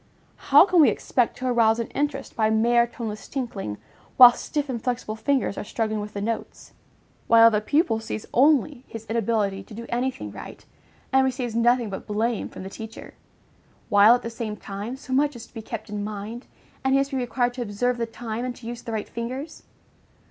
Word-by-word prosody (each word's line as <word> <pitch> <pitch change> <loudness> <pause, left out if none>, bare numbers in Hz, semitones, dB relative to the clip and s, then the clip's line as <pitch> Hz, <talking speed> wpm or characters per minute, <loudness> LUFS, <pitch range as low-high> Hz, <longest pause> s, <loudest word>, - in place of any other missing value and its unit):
How 290 +5 +8
can 360 -4 +4
we 295 - +7
expect 245 -3 0
to 255 - -5
arouse 230 -3 +3
an 230 - -2
interest 285 -1 -3
by 220 -1 +2
mere 235 +2 +3
toneless 215 -3 -6
tinkling, 215 - -4 0.4
while 245 -2 +10
stiff, 295 +2 -3
inflexible 245 -3 -3
fingers 245 -1 0
are - - -4
struggling 215 0 -2
with 210 0 -7
the 200 - -4
notes; 225 +2 -5 0.5
while 230 0 +7
the 210 -1 +1
pupil 285 - +1
sees 220 -1 -6
only 275 -1 +3
his 225 -1 -9
inability 220 -3 0
to 205 - -12
do 235 +1 -7
any 245 +2 0
thing 260 - -8
right, - - -10 0.5
and 265 0 +5
receives 250 -3 -2
nothing 235 -1 +2
but 190 - -7
blame 220 +2 -1
from - - -9
the - - -6
teacher; 225 +1 -9 0.8
while, 205 +3 +7
at 245 - -5
the 230 - -5
same 225 -2 -5
time, 205 +5 -6
so 265 -1 -7
much 290 +1 +2
is 235 -1 -9
to - - -25
be 225 - -6
kept 220 0 -7
in 210 -1 -4
mind, 215 +3 -6 0.4
and 265 0 +2
he - - +4
must 275 +1 -1
be 270 - -1
required 245 -1 0
to 250 - -6
observe 240 +3 -1
the 230 - -1
time, 225 0 -5
and 250 -1 -4
to 240 - -14
use 235 0 -6
the 230 - -7
right 215 -2 -3
fingers? 255 +7 -6
235 Hz, 205 wpm, -24 LUFS, 220-255 Hz, 0.8 s, while